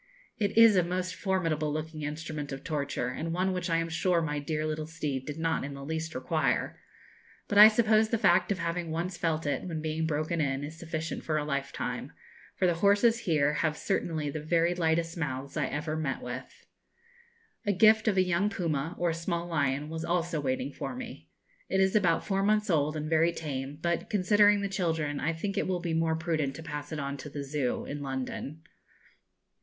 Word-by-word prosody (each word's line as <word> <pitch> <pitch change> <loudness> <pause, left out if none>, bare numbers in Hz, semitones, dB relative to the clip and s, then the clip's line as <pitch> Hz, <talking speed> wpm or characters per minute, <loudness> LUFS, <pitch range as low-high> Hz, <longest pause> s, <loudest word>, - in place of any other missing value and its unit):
It 205 0 0
is 230 -2 +8
a 185 - +5
most 180 +1 -2
formidable 165 -6 0
looking 155 +1 -4
instrument 150 -1 -4
of 135 - -6
torture, 145 -5 -2
and 160 +6 -4
one 185 +2 0
which 180 -1 -2
I 165 - +2
am 165 0 0
sure 170 +1 +2
my 150 -3 -1
dear 155 +1 -2
little 155 0 -3
steed 145 -5 -4
did 150 0 -5
not 165 0 0
in 140 0 -5
the 140 0 -8
least 160 +1 -4
require; 130 +5 0 0.7
but 205 - +3
I 210 - +13
suppose 220 0 +3
the 230 - +1
fact 210 - +3
of 200 - +1
having 170 -1 -2
once 170 +3 -2
felt 160 -2 -1
it, 145 - 0
when 165 -4 -4
being 160 +1 -1
broken 155 +2 -1
in, 135 -1 -1
is 155 +3 -7
sufficient 160 -1 -4
for 155 -1 0
a 150 - -1
lifetime, 140 -2 -3 0.4
for - - +1
the 175 - +4
horses 205 +6 +4
here 150 -6 +2
have 155 0 0
certainly 155 -3 -1
the 155 - -4
very 170 +2 +2
lightest 165 0 0
mouths 140 -3 -4
I 150 -4 0
ever 155 +1 -3
met 150 -5 -2
with. 125 +1 -6 1.2
A - - +4
gift 215 +3 +5
of 205 -3 +2
a 185 - +6
young 185 +3 +1
puma, 165 -4 -2
or 175 -2 +1
small 170 +1 -2
lion, 145 -3 0
was 160 +1 -5
also 170 -2 0
waiting 135 +1 -2
for - - -5
me. 250 -1 -8 0.4
It 190 - +1
is 190 +1 +3
about 180 -6 +3
four 195 -1 0
months 210 0 +2
old, 155 -1 +1
and 155 0 -3
very 165 +1 +3
tame; 140 -3 -5
but, 170 0 -1
considering 205 +1 +4
the 200 - 0
children, 160 -6 -1
I 160 - 0
think 200 +5 -2
it - - -1
will 185 -1 0
be 170 -2 -2
more 160 0 +1
prudent 160 -4 -1
to 160 - -8
pass 150 -1 -6
it 155 - -3
on 140 -1 -3
to 150 - -8
the 145 0 -5
Zoo, 140 -2 -2
in 145 0 -5
London. 135 +3 -5
160 Hz, 205 wpm, -29 LUFS, 150-180 Hz, 1.2 s, I